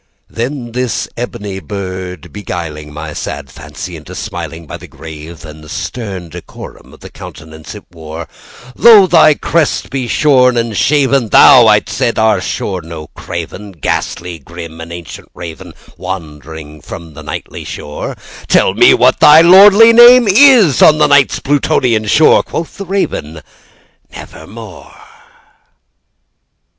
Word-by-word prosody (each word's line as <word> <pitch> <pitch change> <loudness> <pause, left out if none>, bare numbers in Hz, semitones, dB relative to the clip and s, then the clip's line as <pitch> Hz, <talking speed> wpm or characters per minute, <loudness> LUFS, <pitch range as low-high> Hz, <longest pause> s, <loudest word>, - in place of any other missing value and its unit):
Then 120 +1 -5
this 120 -2 -3
ebony 105 -5 -6
bird 95 -4 -8
beguiling 85 -6 -7
my 75 +1 -8
sad 70 -2 -7
fancy - - -10
into - - -12
smilingBy 80 -1 -8
the - - -13
grave 80 0 -12
and 75 0 -13
stern 95 - -7
decorum 85 +1 -12
of - - -19
the - - -12
countenance 80 0 -12
it - - -12
wore,—"Though 90 - +1
thy 165 -4 +4
crest 160 0 -2
be 130 -3 -4
shorn 125 -3 +2
and 115 -2 -2
shaven, 135 -2 +1
thou," 125 -1 +6
I 105 -1 +4
said, 115 - -3
"art 110 0 +1
sure 95 -3 -4
no 80 -1 -10
craven, 90 +4 -8
Ghastly 85 +1 -4
grim 85 -1 -11
and 85 +1 -10
ancient 85 -2 -10
Raven 85 -2 -10 0.3
wandering 80 -4 -9
from 85 +1 -11
the - - -12
Nightly - - -8
shore:Tell 75 0 -3
me - - +5
what - - +2
thy 150 +2 +7
lordly 200 +6 +7
name 240 0 +7
is 215 - +4
on 155 - +6
the 150 - +3
Night's 145 -2 +2
Plutonian 125 -5 -1
shore!"Quoth 160 +5 +1
the 200 - -7
Raven, 80 - -4 0.7
"Nevermore." - - -12
100 Hz, 130 wpm, -13 LUFS, -, 0.7 s, thy